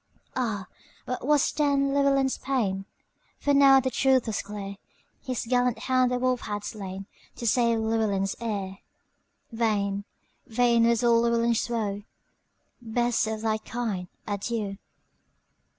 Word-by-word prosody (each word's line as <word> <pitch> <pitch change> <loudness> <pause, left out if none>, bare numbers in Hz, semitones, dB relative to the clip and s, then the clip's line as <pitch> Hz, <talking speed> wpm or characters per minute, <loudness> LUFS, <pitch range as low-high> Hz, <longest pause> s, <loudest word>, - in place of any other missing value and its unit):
Ah, 220 -6 -1 0.4
what 250 +1 -4
was 295 -2 +3
then 280 -2 +1
Llewelyn's 275 -1 +2
pain! 200 -8 -1 0.5
For 285 - +1
now 275 -1 +7
the 260 0 -1
truth 260 0 +3
was 220 - -2
clear; 200 -1 -7 0.4
His 255 -3 -3
gallant 245 0 +1
hound 255 -1 +2
the 250 - +1
wolf 255 0 0
had 205 -1 -4
slainTo 195 -2 -6 0.4
save 235 0 +3
Llewelyn's 215 -3 0
heir:Vain, 200 0 -4 0.4
vain 235 0 +3
was 235 +1 +2
all 235 -1 +5
Llewelyn's 235 0 +1
woe;"Best 225 +2 -3
of 220 0 -3
thy 220 -1 0
kind, 215 -6 -4 0.2
adieu! 205 -1 -3
230 Hz, 120 wpm, -27 LUFS, 205-250 Hz, 0.5 s, now